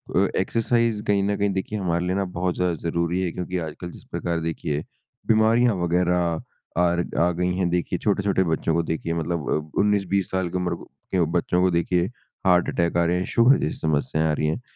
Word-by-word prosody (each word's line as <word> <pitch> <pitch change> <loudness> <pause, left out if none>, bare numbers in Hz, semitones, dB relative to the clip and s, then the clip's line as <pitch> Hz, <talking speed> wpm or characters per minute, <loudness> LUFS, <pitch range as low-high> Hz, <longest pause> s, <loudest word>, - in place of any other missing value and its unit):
अ, - - +4
exercise 115 -1 +1
कहीं 100 -1 +2
न 100 +1 +1
कहीं 100 0 +1
देखिए 95 +3 -3
हमारे 85 -2 0
लिए 90 +1 0
ना 100 0 0
बहुत 90 0 0
ज़्यादा 90 -1 +1 0.2
ज़रूरी 85 +2 0
है, 90 - -1
क्योंकि 90 +1 -4
आजकल 80 +1 -6
जिस - - -13
प्रकार 85 -1 -2
देखिए, 75 -2 -2 0.4
बीमारियाँ 115 +2 +4
वग़ैरह 85 -1 +1 0.4
आरग 85 0 0
आ 85 - +4
गई 90 +1 -1
हैं। 90 -2 0
देखिए, 90 0 -1
छोटे-छोटे 100 -2 +1
बच्चों 80 -1 0
को 85 - +2
देखिए 80 0 -2
मतलब 85 -2 -2 0.3
अ, - - 0
19-20 100 -2 +1
साल 95 -2 -1
की 90 - -2
उम्र 90 -1 -1 0.4
के 90 -3 +2
बच्चों 90 +1 0
को 90 0 +3
देखिए 85 +1 +1 0.4
हार्ट-अटैक 90 -1 +2
आ 85 - +4
रहे 85 +1 +1
हैं, 90 - -1
शुगर 120 +4 +5
जैसी 75 - -2
समस्याएँ 80 +1 0
आ - - +2
रही 75 +1 0
हैं। 80 +10 -2
90 Hz, 200 wpm, -24 LUFS, 85-95 Hz, 0.4 s, शुगर